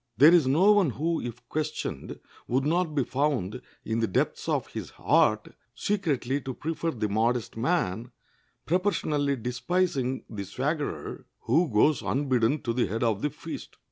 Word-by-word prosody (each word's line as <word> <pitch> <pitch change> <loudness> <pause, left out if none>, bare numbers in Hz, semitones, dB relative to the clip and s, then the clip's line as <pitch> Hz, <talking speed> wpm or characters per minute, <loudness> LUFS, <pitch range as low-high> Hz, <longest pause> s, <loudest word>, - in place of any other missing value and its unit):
There 150 +7 +8
is 165 -7 +5
no 170 +10 +5
one 205 -6 +4
who, 160 +8 -1
if 120 0 -7
questioned, 155 0 -4 0.3
would 130 +3 +1
not 165 0 +1
be 140 - +2
found 125 -6 -1 0.2
in 110 +1 -1
the 115 - +1
depths 90 - -1
of - - +1
his - - -5
heart 110 0 +2 0.2
secretly 145 -10 -1
to 130 -1 -5
prefer 165 +1 -2
the 110 -8 -2
modest 115 +3 0
man, 120 - 0 0.6
proportionally 155 -6 +1
despising 130 +2 -1
the 100 -3 -5
swaggerer 145 - -3 0.2
"who 170 -1 +2
goes 125 +8 +4
unbidden 130 0 +1
to 115 - -1
the 120 -2 +1
head 110 +6 -2
of 110 -3 +1
the 150 - +1
feast." - - -8
135 Hz, 155 wpm, -27 LUFS, 115-155 Hz, 0.6 s, There